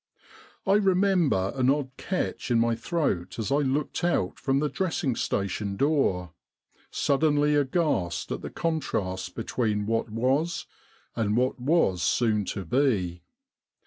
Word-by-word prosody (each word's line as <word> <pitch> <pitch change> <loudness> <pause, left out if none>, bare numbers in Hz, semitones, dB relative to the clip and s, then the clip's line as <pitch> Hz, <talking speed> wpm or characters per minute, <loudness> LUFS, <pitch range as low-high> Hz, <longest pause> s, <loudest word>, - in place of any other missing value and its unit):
I 195 - +3
remember 185 - +2
an 130 -1 +2
odd 140 -2 +1
catch 185 -7 -3
in 120 - +3
my 115 0 +2
throat 115 - -2
as 115 +2 -3
I 140 - +4
looked 145 +3 -1
out 170 - 0
from 135 0 +1
the 150 +2 +1
dressing 155 -7 -1
station 100 0 -2
door, 95 - +1 0.6
suddenly 145 +1 +2
aghast 145 - 0
at - - -3
the - - -6
contrast 95 - -2
between 110 -2 -1
what 115 +1 -1
was 135 +10 0 0.5
and 110 -1 0
what 125 +1 +1
was 125 - +2
soon 105 +3 +1
to 95 +1 -4
be. 95 - +1
130 Hz, 135 wpm, -27 LUFS, 100-150 Hz, 0.6 s, I